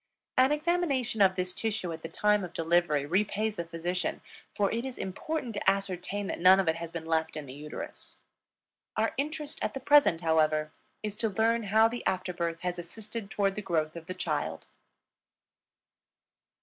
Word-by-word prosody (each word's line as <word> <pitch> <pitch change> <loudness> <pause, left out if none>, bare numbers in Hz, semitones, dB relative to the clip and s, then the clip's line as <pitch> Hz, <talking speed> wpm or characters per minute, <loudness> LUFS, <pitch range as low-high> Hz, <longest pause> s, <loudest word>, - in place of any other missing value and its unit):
An 260 +2 +5
examination 295 -8 +1
of 190 -1 +6
this 180 -1 -1
tissue 205 -5 -2
at 160 - -8
the 165 - -6
time 210 -1 +2
of 175 -1 -6
delivery 165 -3 +2
repays 210 +5 0
the 170 - -2
physician, 175 +2 -2 0.3
for 200 -1 +2
it 230 +1 -1
is 260 -1 -5
important 245 - -3
to 200 - +2
ascertain 195 +1 -2
that - - -3
none 185 +2 +7
of 190 - +1
it 160 0 +2
has 165 -1 -6
been 170 -1 -5
left 160 -1 0
in 150 - -5
the 130 - -9
uterus. 150 +2 -8 0.8
Our - - +1
interest 300 +1 -3
at 270 -1 -3
present, 285 - +6
however, 155 -2 +2 0.3
is 210 -1 -3
to 225 - 0
learn 225 +2 +1
how 220 +3 +5
the 240 +1 -5
after 185 -1 -1
birth 170 -1 -2
has 180 -1 -2
assisted 205 +4 -7
toward 200 -2 +1
the 210 - -4
growth 160 -5 -1
of 165 0 -8
the 185 - -4
child. - - -2
190 Hz, 175 wpm, -29 LUFS, 165-220 Hz, 0.8 s, none